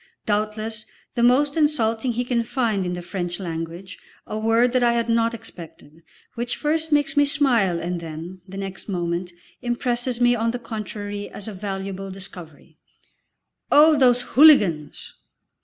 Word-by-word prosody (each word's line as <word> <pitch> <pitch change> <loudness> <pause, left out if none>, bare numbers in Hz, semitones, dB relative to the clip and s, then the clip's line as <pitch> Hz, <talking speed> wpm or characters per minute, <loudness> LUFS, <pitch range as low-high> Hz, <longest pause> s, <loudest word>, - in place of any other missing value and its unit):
doubtless 215 +1 -2 0.3
the 240 - -1
most 270 +4 +4
insulting 245 -6 +1
he 245 +2 -1
can 240 -1 +1
find 225 -6 -1
in 180 - -2
the 175 0 -5
French 175 0 -4
language, 170 +1 -6 0.3
a - - -6
word 225 +3 +2
that 255 0 +2
I 240 -1 +4
had 235 0 -1
not 230 0 +2
expected, 165 -7 -12 0.3
which 240 0 -3
first 320 +1 -1
makes 295 +2 +2
me 290 - +5
smile 240 - +2
and 175 +1 -3
then, 165 +3 -8
the 195 +1 -9
next 195 +1 -6
moment, 175 -1 -2 0.3
impresses 240 0 -1
me 245 0 +4
on 230 -1 0
the 240 - -2
contrary 205 -3 -6
as 200 - -7
a 215 - -5
valuable 195 0 -5
discovery. 175 -5 -11 0.9
"Oh 305 +2 +7
those 250 -3 +4
hooligans!" 210 - +4
220 Hz, 155 wpm, -23 LUFS, 185-245 Hz, 0.9 s, Oh